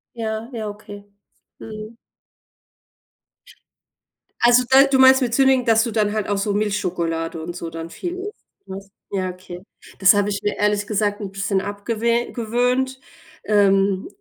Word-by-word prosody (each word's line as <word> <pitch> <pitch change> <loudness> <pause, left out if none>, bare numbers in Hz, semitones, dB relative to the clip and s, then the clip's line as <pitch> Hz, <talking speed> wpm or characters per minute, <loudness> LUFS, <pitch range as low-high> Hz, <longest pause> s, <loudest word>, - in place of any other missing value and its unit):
Ja, 220 0 -4
ja, 220 -3 -4
okay. 205 0 -11 0.5
Mhm. 215 +1 -9 2.5
Also, 240 +1 +5
da 265 +1 +7
du 270 -1 +1
meinst 265 +1 +7
mit 240 -3 -1
sündigen, 265 -2 +3
dass 225 -2 +4
du 235 - -3
dann 210 -2 0
halt 215 -2 -2
auch 205 - 0
so 200 +1 -1
Milchschokolade 170 -6 -2
und 170 +2 -6
so 170 -2 -6
dann 165 0 -7
viel 355 - -6
isst, 410 +2 -9 0.2
ne? 190 +1 -6 0.3
Ja, 185 -2 -2
okay. 180 -1 -11 0.4
Das 190 -1 +7
habe 205 0 +1
ich 200 - -3
mir 205 - -1
ehrlich 205 0 0
gesagt 205 0 -1
'n 200 -3 -6
bisschen 195 0 -1
abgewe 230 +4 -2
gewöhnt. 250 +3 -1 0.4
Ähm, 195 -2 +2
210 Hz, 150 wpm, -21 LUFS, 195-235 Hz, 2.5 s, da